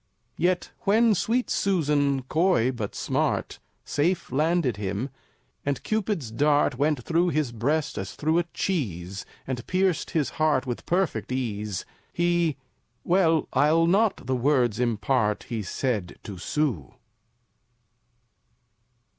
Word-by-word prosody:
Yet 180 +2 +1
when 225 +1 +4
sweet 235 +6 0
Susan, 145 -7 +1
coy 155 -3 +2
but 110 -5 -5
smart, - - -1 0.3
Safe 165 +2 0
landed 150 - +1
him, 105 +6 -3 0.5
and 140 -2 -2
Cupid's 200 - -1
dart 145 +2 +2
Went 145 -1 0
through 170 +4 +2
his 155 -6 0
breast 140 +6 -1
as 95 0 -6
through 160 +3 +1
a 175 - 0
cheese, 100 - -3 0.2
And 125 -2 -4
pierced 185 -2 +1
his 155 -5 0
heart 150 -4 +3
with 120 -2 -5
perfect 180 -6 0
ease, 105 -6 -3 0.3
He 175 -4 +1 0.5
well, 170 -3 +3
I'll 160 +3 +4
not 200 +4 +2
the 130 - 0
words 125 -3 +2
impart 110 -2 +1
He 115 -3 -2
said 105 -2 -2
to 100 -5 -8
Sue! 120 - -2
145 Hz, 120 wpm, -26 LUFS, 120-175 Hz, 0.5 s, when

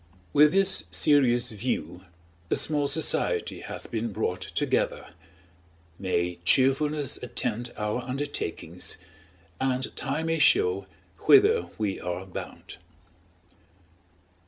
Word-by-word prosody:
With 150 +1 +6
this 195 0 +2
serious 125 -5 +2
view, 95 -5 -4 0.4
a - - +2
small 145 -2 +2
society 155 +3 0
has - - -7
been 115 0 -3
brought 90 -3 -2
together; - - -1 0.9
may 90 -2 -1
cheerfulness 135 +6 +2
attend 120 -1 -3
our 105 +3 -2
undertakings, 125 - -4 0.6
and 130 0 -1
time 140 +4 -2
may 165 0 0
show 95 -8 +3 0.4
whither 420 +3 +6
we 105 -3 -2
are 90 +1 -4
bound. 95 - -9
125 Hz, 100 wpm, -27 LUFS, 95-145 Hz, 0.9 s, With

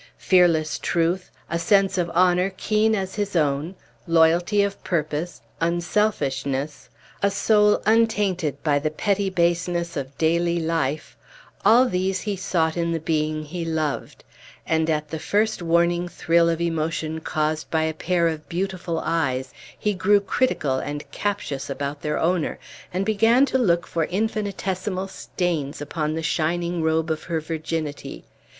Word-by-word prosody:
Fearless 170 -4 +3
truth, 175 +2 0 0.2
a 170 - -2
sense 195 +2 +3
of 175 -2 0
honor 180 +1 +3
keen 215 +1 +2
as 190 -2 -3
his 205 -2 -3
own, 150 +3 0 0.3
loyalty 170 +5 +4
of 200 0 -3
purpose, 160 0 -2 0.2
unselfishness, 150 -7 -1 0.3
a 200 - +3
soul 210 +1 +3
untainted 205 - +1
by 145 -2 +2
the 155 +2 -1
petty 200 +5 0
baseness 170 -1 0
of 140 -1 -5
daily 170 +1 +2
life 160 -3 -2 0.5
all 245 +3 +6
these 190 -4 -1
he 205 -2 -2
sought 175 -4 0
in 170 -1 0
the 165 - -1
being 155 -1 -1
he 170 +3 -5
loved; 160 -3 -3 0.4
and 160 0 +1
at 150 -1 -1
the 160 - -4
first 210 +5 0
warning 170 +1 +2
thrill 170 -1 +2
of 165 -1 0
emotion 160 -1 -2
caused 155 0 -2
by 160 -1 +1
a 160 0 0
pair 170 +1 +1
of 155 -2 -4
beautiful 185 -1 -2
eyes, 130 -6 -1 0.2
he 210 - 0
grew 200 +2 +4
critical 190 - 0
and 145 +1 -6
captious 145 -9 -3
about 140 +1 -4
their 150 -1 -1
owner, 170 -1 0 0.3
and 185 +2 -1
began 225 +5 +4
to 260 - 0
look 175 -7 +2
for 165 -2 -1
infinitesimal 195 -1 -2
stains 170 -7 -3
upon 150 +1 -2
the 160 - -3
shining 170 +2 0
robe 160 0 +1
of 155 - -3
her 165 -2 -1
virginity. 155 -1 -4
170 Hz, 145 wpm, -23 LUFS, 155-190 Hz, 0.5 s, all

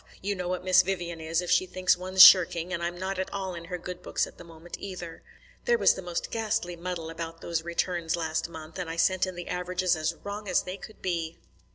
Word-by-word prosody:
You 205 +2 -2
know 180 -2 -4
what 180 0 -2
Miss 185 0 +6
Vivian 175 -3 -3
is, 165 +2 0
if 175 - -3
she 185 - +3
thinks 185 0 +2
one's 185 +1 +6
shirking, 175 -1 +7
and 170 - -2
I'm 175 +1 -3
not 190 +1 -3
at 190 - -3
all 190 -2 -3
in 170 -1 -8
her 180 +1 -4
good 180 +1 -7
books - - -1
at - - -15
the - - -9
moment, 165 0 -10
either. 175 -4 -7 0.4
There 480 -1 +4
was - - +5
the - - -7
most 175 -2 -4
ghastly 220 -5 -1
muddle 170 -1 -5
about 165 0 -7
those 170 -1 -2
returns 170 0 -1
last 160 -1 -2
month, 160 +1 -9
and 180 -2 -4
I 165 - -4
sent 185 +2 +2
in 185 - -6
the 175 0 -7
averages 180 0 0
as 160 +1 -1
wrong 205 +1 -6
as 185 - +2
they 185 +1 -6
could 215 - -13
be." 170 -3 -2
180 Hz, 240 wpm, -28 LUFS, 170-185 Hz, 0.4 s, shirking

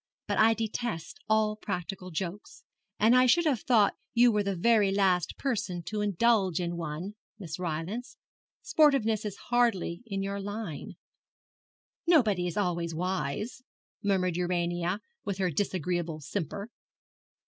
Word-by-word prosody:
But - - 0
I 225 +1 +6
detest 225 -5 -4
all 215 -1 +3
practical 185 -2 -4
jokes, 180 +4 -5 0.3
and 225 +4 +5
I 255 0 +6
should 340 +7 +4
have 270 -9 +2
thought 220 -5 +4 0.2
you 240 0 +6
were 210 -1 +2
the 200 -1 -1
very 210 +1 +4
last 190 -3 +2
person 205 -10 -2
to 210 +4 -3
indulge 205 -3 +2
in 175 -1 -2
one, 170 +4 -4 0.2
Miss 175 -5 -6
Rylance. 180 +8 -4 0.5
Sportiveness 230 -9 +3
is 205 -2 -3
hardly 230 -8 +1
in 195 -2 -2
your 200 +1 -3
line.' 205 -5 -5 1.1
'Nobody 215 - +4
is 175 - -4
always 170 -4 -1
wise,' 185 - -2 0.4
murmured 185 -3 +1
Urania, 175 +1 -1 0.2
with 200 -2 -3
her 185 -2 0
disagreeable 175 -2 -1
simper. 195 - -4
195 Hz, 135 wpm, -29 LUFS, 175-220 Hz, 1.1 s, I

